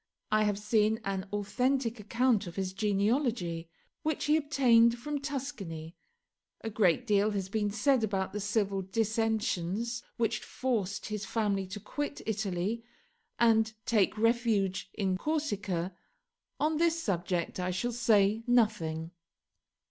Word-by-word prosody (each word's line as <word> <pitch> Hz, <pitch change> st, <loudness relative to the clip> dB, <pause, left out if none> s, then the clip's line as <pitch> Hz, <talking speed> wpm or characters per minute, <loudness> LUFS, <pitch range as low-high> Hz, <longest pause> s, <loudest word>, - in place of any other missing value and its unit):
I 215 Hz, 0 st, +4 dB
have 205 Hz, -1 st, +1 dB
seen 215 Hz, +1 st, +2 dB
an 195 Hz, 0 st, -2 dB
authentic 230 Hz, +4 st, 0 dB
account 225 Hz, 0 st, +1 dB
of 170 Hz, -, -8 dB
his 190 Hz, -1 st, -2 dB
genealogy, 200 Hz, -, 0 dB, 0.3 s
which 315 Hz, -2 st, -1 dB
he 300 Hz, -, +4 dB
obtained 245 Hz, -6 st, +4 dB
from 290 Hz, +4 st, -3 dB
Tuscany. 195 Hz, -, -5 dB, 0.7 s
A 225 Hz, -, -4 dB
great 210 Hz, +2 st, +2 dB
deal 210 Hz, -1 st, +3 dB
has 195 Hz, -3 st, -3 dB
been 210 Hz, 0 st, 0 dB
said 240 Hz, +4 st, +2 dB
about 195 Hz, -3 st, -1 dB
the 210 Hz, -, -2 dB
civil 200 Hz, -1 st, 0 dB
dissensions 220 Hz, +1 st, -1 dB, 0.2 s
which 225 Hz, -2 st, +1 dB
forced 220 Hz, -7 st, -2 dB
his 210 Hz, -1 st, -4 dB
family 205 Hz, -4 st, 0 dB
to 195 Hz, +3 st, -6 dB
quit 285 Hz, +8 st, -4 dB
Italy 210 Hz, +1 st, -2 dB, 0.5 s
and 225 Hz, -2 st, +4 dB
take 215 Hz, -1 st, +2 dB
refuge 220 Hz, -5 st, +1 dB
in 190 Hz, -3 st, 0 dB
Corsica. 205 Hz, -, -2 dB, 0.6 s
On 310 Hz, +1 st, +1 dB
this 335 Hz, 0 st, +2 dB
subject 180 Hz, -, -1 dB
I 180 Hz, 0 st, -1 dB
shall 185 Hz, +7 st, -1 dB
say 220 Hz, -3 st, +3 dB
nothing. 175 Hz, -9 st, +1 dB
215 Hz, 130 wpm, -30 LUFS, 195-235 Hz, 0.7 s, I